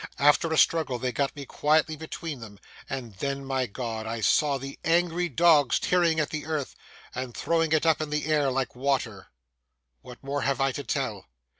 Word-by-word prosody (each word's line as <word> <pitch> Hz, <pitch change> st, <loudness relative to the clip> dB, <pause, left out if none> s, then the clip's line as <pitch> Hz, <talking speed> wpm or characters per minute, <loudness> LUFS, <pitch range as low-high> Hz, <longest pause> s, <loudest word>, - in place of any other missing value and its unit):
After 145 Hz, +3 st, +4 dB
a 160 Hz, -, +1 dB
struggle, 155 Hz, -7 st, +3 dB
they 125 Hz, +1 st, -2 dB
got 140 Hz, +2 st, -1 dB
me 140 Hz, -1 st, -7 dB
quietly 155 Hz, +3 st, +1 dB
between 160 Hz, -1 st, -6 dB
them; 105 Hz, -3 st, -11 dB, 0.3 s
and 125 Hz, -5 st, -5 dB
then, 140 Hz, +2 st, -3 dB
my 130 Hz, -1 st, -1 dB
God! 110 Hz, 0 st, -5 dB
I 115 Hz, +1 st, -3 dB
saw 140 Hz, +6 st, +3 dB
the 135 Hz, +1 st, -8 dB
angry 175 Hz, +1 st, +1 dB
dogs 150 Hz, -3 st, +4 dB
tearing 170 Hz, -3 st, +2 dB
at 155 Hz, 0 st, -1 dB
the 155 Hz, -1 st, -4 dB
earth 155 Hz, -4 st, -2 dB, 0.4 s
and 125 Hz, -2 st, -5 dB
throwing 165 Hz, -1 st, +1 dB
it 160 Hz, 0 st, +2 dB
up 160 Hz, -1 st, +3 dB
into 150 Hz, -1 st, -1 dB
the 150 Hz, -, -3 dB
air 150 Hz, -3 st, +2 dB
like 130 Hz, -2 st, -2 dB
water. 125 Hz, -7 st, -1 dB, 0.7 s
What 125 Hz, +1 st, -13 dB
more 140 Hz, +1 st, -2 dB
have 135 Hz, +1 st, 0 dB
I 135 Hz, 0 st, +2 dB
to 145 Hz, -, -5 dB
tell? 120 Hz, -9 st, -3 dB
140 Hz, 190 wpm, -27 LUFS, 130-155 Hz, 0.7 s, After